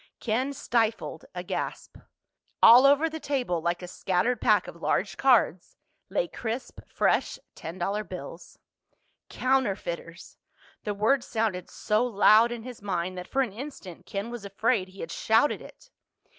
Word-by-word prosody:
Ken 250 +5 -1
stifled 225 - -1
a 180 - -4
gasp. - - -5 0.7
All 245 +4 +9
over 285 +3 +4
the 320 0 -6
table, 260 - -1
like 175 +2 -1
a - - -6
scattered 190 +7 0
pack - - +3
of - - -9
large - - 0
cards, 240 -9 +2 0.3
lay - - 0
crisp 235 +2 -5
fresh - - +1 0.2
ten 165 +3 -8
dollar 200 +4 -1
bills. 175 -3 -9 0.7
Counterfeiters! 195 -10 -2 0.5
The 210 -1 -2
word 240 +6 +2
sounded 215 -6 -2
so 215 +2 0
loud 225 0 +5
in 235 -2 -5
his 245 -3 -9
mind 185 -2 -2
that 180 - -8
for 270 0 +1
an 225 -7 -5
instant 225 - -9
Ken 200 +4 -4
was 240 -3 -7
afraid 200 0 0
he 190 +1 -12
had 165 - -6
shouted 225 +10 +2
it. - - -15
220 Hz, 150 wpm, -27 LUFS, 185-250 Hz, 0.7 s, All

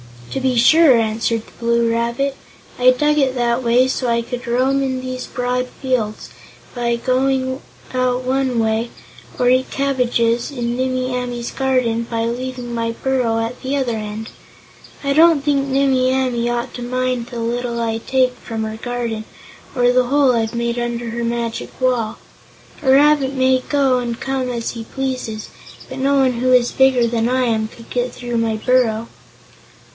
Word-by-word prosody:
"To - - -2
be 260 -1 +1
sure," 265 +3 +6
answered 225 0 0
the - - -18
Blue 235 0 +2
Rabbit; 235 +4 -1 0.4
"I 250 +1 +6
dug 295 +4 +1
it 265 -2 +1
that 240 0 +1
way 245 +1 +3
so 260 -1 -1
I 235 0 +1
could 245 +1 -6
roam 260 +3 +2
in 260 -1 -1
these 255 0 -5
broad 250 0 -2
fields, 250 -5 -3 0.4
by 235 -1 0
going 260 +2 0 0.3
out 255 0 0
one 260 -1 0
way, 225 +1 0 0.5
or 245 -1 +3
eat 255 +1 +2
the - - -9
cabbages 245 -4 +1
in 240 -4 -3
Nimmie 255 0 -1
Amee's 245 -1 -3
garden 250 -4 0
by 230 -1 -1
leaving 245 0 -4
my 230 0 -1
burrow 245 -3 0
at 230 +2 -4
the 265 +2 -2
other 255 -5 0
end. 215 +1 -6 0.7
I 280 - 0
don't 320 -1 +5
think 280 -2 +1
Nimmie 265 -1 +2
Amee 250 -3 0
ought 240 0 -2
to 245 - -6
mind 255 0 -1
the 240 -2 -6
little 235 +1 -2
I 225 -1 -1
take 255 +1 +1
from 225 -1 -5
her 220 0 -4
garden, 235 -2 -4 0.5
or 245 -1 +4
the 250 0 +3
hole 275 0 +3
I've 225 0 -1
made 235 0 -1
under 240 0 -3
her 235 0 -3
magic 235 -1 -3
wall. 245 -4 0 0.6
A 270 - 0
rabbit 280 0 +4
may 260 -1 +3
go 265 -1 +1
and 235 -1 -4
come 265 -1 -2
as 235 -2 -3
he 230 -1 -7
pleases, 255 -5 -4 0.4
but 260 0 -7
no 275 +1 +2
one 255 -3 +2
who 255 +1 +2
is 245 -1 +4
bigger 265 -2 +4
than 230 0 0
I 255 0 +1
am 220 -3 0
could 230 +1 -15
get 250 0 -1
through 240 -1 -4
my 225 -1 0
burrow." 230 -1 +1
245 Hz, 175 wpm, -19 LUFS, 235-260 Hz, 0.7 s, sure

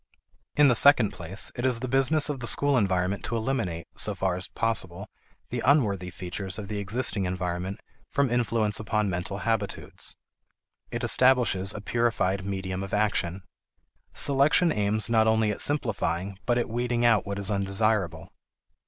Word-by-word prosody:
In 145 -1 +6
the 125 - +5
second 125 -3 +5
place, 90 +4 -4
it 120 - -4
is 125 -3 +1
the 130 - -4
business 135 +4 +3
of 145 -3 -4
the 120 - -1
school 145 +3 +2
environment 95 -3 0
to 120 - -3
eliminate, 110 -8 -2
so - - -1
far 95 -1 -1
as 90 0 -4
possible, 100 -4 -2 0.4
the - - -2
unworthy 105 - +2
features 90 +1 -4
of 105 -2 -7
the 105 -1 -3
existing 100 -1 +3
environment 90 +1 -3 0.3
from 140 -3 0
influence 115 -3 0
upon 105 -2 -1
mental 90 +2 -4
habitudes. 110 -3 -3 0.7
It - - -5
establishes 120 -7 +3
a 105 - -7
purified 100 -4 0
medium 95 -1 -4
of 100 +1 -3
action. 95 -3 -1 0.7
Selection 145 +5 +4
aims 105 -2 +2
not 110 -1 +3
only 110 -1 +2
at 105 - -3
simplifying 100 - 0
but 120 -1 +2
at 120 - 0
weeding 120 +1 -1
out 115 -4 +3
what 100 0 -3
is 100 +1 -2
undesirable. 100 -4 -1
105 Hz, 160 wpm, -26 LUFS, 95-120 Hz, 0.7 s, In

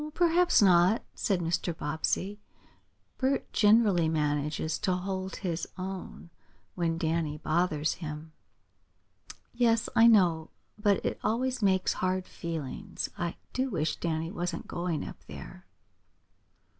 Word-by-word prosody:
"Perhaps 350 -6 +4
not," 180 +3 +5
said 190 -4 0
Mr. 170 0 -1
Bobbsey. 170 +7 -2 0.8
"Bert 270 +1 0
generally 205 -6 +4
manages 150 0 -1
to 185 - +1
hold 185 +1 -3
his 175 -4 -3
own 185 -2 -7 0.4
when 165 -2 -1
Danny 160 -2 -1
bothers 155 -1 0
him." 155 0 -6 1.2
"Yes, 235 -1 +2
I 230 +1 +7
know. 175 -8 +4 0.3
But 205 -1 +1
it - - -2
always 250 +4 0
makes 190 -2 +2
hard 185 0 -1
feelings. 165 -8 -5
I 170 -1 -3 0.2
do 260 +1 0
wish 160 -7 -1
Danny 165 0 -2
wasn't 175 -3 -3
going 175 -3 -2
up - - -10
there." - - -10
180 Hz, 120 wpm, -29 LUFS, 160-205 Hz, 1.2 s, I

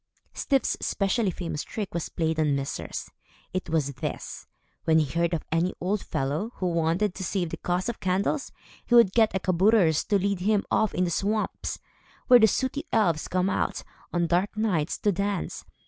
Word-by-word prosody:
Styf's 275 -2 +1
especially 200 +2 +1
famous 165 -4 -4
trick 210 -4 -5
was 170 -1 -3
played 160 -1 -1
on 150 -2 +2
misers. 140 0 -4 0.4
It 185 - -3
was 150 -3 0
this. - - -6 0.4
When 160 0 +4
he 155 - +4
heard 170 +4 0
of 160 - -5
any 170 +3 +1
old 190 +3 -1
fellow, 150 - -2
who 185 - -3
wanted 170 +4 +1
to 190 - -6
save 175 -2 -1
the - - -4
cost 180 +1 -1
of 235 - -3
candles, 190 +10 0 0.3
he 240 - +2
would 235 -5 +7
get 220 -4 +3
a - - +2
kabouter 185 -1 +4
to 200 +7 +1
lead 200 0 0
him 205 +2 +1
off 220 -2 +2
in 180 - +2
the 175 - 0
swamps, 210 +5 -1 0.5
where 250 -1 +8
the 220 - +7
sooty 260 +6 -1
elves 175 -9 +2
come 185 0 +1
out, 195 - -1 0.3
on 175 -1 +1
dark 180 +5 0
nights, 180 -9 0
to 205 - +1
dance. 200 0 -3
185 Hz, 185 wpm, -26 LUFS, 165-210 Hz, 0.5 s, where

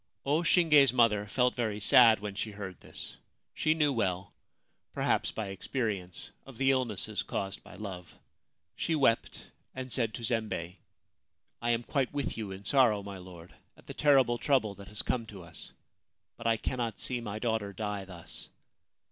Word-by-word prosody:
O 150 +4 +2
Shinge's 155 -7 +6
mother 110 -4 +3
felt 125 +3 +2
very 110 -4 -1
sad 110 +1 +7
when 105 -1 -4
she 105 +2 -3
heard 95 -3 -7
this. - - -8 0.4
She 155 0 +2
knew 150 -3 +3
well 95 -5 -1 0.6
(perhaps - - +1
by 110 -3 -4
experience) 95 -3 -3
of 135 -4 -13
the 135 +1 +4
illnesses 125 -7 -1
caused 95 0 -3
by - - -13
love. 95 -5 -7 0.6
She 165 - 0
wept, 130 -6 +1 0.2
and 130 -1 -4
said 115 -4 0
to 120 - -7
Zembei: 105 -6 -1 0.4
* - - -50
I 120 - 0
am 120 0 +2
quite 135 +1 0
with 145 -1 -2
you 110 -3 -5
in 95 +1 -8
sorrow, 110 -3 +4
my 100 -1 -7
lord, 90 -2 -12 0.2
at - - -19
the - - -7
terrible 135 -5 +4
trouble 130 -8 +2
that 100 0 -12
has 105 - 0
come 115 -3 -1
to 100 -4 -10
us; 85 -1 -7 0.6
but - - -4
I 115 -1 +3
cannot 120 0 -3
see 125 -2 -1
my 105 -2 -4
daughter 110 -3 -1
die 105 -1 -3
thus. 90 -3 -9
110 Hz, 175 wpm, -31 LUFS, 100-130 Hz, 0.6 s, sad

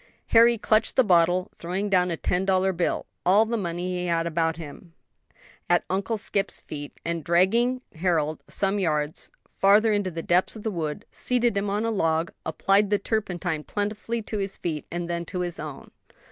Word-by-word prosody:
Harry 235 +1 +6
clutched 220 +1 +1
the 260 - +6
bottle, 180 -2 +3
throwing 185 +4 -3
down 180 -2 +3
a 170 - -2
ten 180 +1 0
dollar 190 0 +2
bill 175 0 -1 0.2
(all 200 +5 +5
the 230 +1 -2
money 175 -4 -3
he 180 - -2
had 165 -1 +1
about 165 -1 0
him) 165 +2 -10 0.7
at 175 0 +4
Uncle 195 +4 -1
Scip's 200 -1 -2
feet, 145 -1 -8
and 170 -1 -2
dragging 230 - +2
Harold 160 -3 0
some 195 - 0
hundred 205 +1 -1
yards 150 -3 -1 0.2
farther 210 +3 +4
into 205 -2 0
the 165 -2 -6
depths 180 +5 +2
of 215 - -9
the 220 - -1
wood, 165 +2 -4
seated 245 -3 +1
him 200 0 0
on 205 +3 0
a 230 - 0
log, 165 -5 0
applied 195 +5 +2
the 205 - +3
turpentine 180 -7 -2
plentifully 210 +4 -3
to 215 0 -4
his 195 0 -2
feet, 155 -4 -4
and 175 0 -4
then 170 0 -2
to 180 +1 -4
his 175 -1 -3
own. 150 -3 -8
185 Hz, 190 wpm, -25 LUFS, 170-205 Hz, 0.7 s, Harry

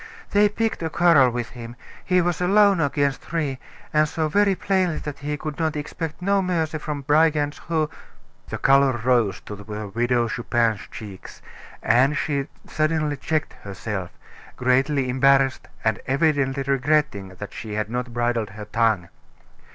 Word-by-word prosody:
They 205 0 +4
picked 225 0 -2
a 165 - -1
quarrel 160 -6 +5
with 120 -1 -4
him; 120 -1 -9 0.3
he 180 -1 +3
was 175 0 -1
alone 200 0 +4
against 140 -2 0
three, 150 -6 -3 0.3
and 155 0 +3
saw 160 -1 -1
very 200 +3 +3
plainly 185 -3 0
that 150 -2 -6
he 150 +1 -3
could 150 +1 -6 0.2
expect 160 +3 -5
no 200 +1 +2
mercy 165 -4 -1
from 150 -1 -4
brigands 150 0 +2
who 160 -2 +1 0.3
" - - -34
The - - -3
color 135 0 +4
rose 120 -4 +1
to 105 - -8
the 100 - -11
Widow 115 +4 -1
Chupin's 115 -2 0
cheeks, 100 -4 -10 0.4
and 130 +6 +3
she 140 -2 -1 0.2
suddenly 155 -1 0
checked 155 +2 -2
herself, 100 -2 -5 0.5
greatly 130 +2 +2
embarrassed, 135 +1 +3 0.2
and 110 -1 +1
evidently 140 -1 +1
regretting 135 -8 0
that 105 +2 -8
she 110 -2 -6
had 105 0 -2
not 125 0 -3
bridled 120 -2 -1
her 105 +1 -9
tongue. 110 -5 +1
140 Hz, 150 wpm, -23 LUFS, 120-155 Hz, 0.5 s, quarrel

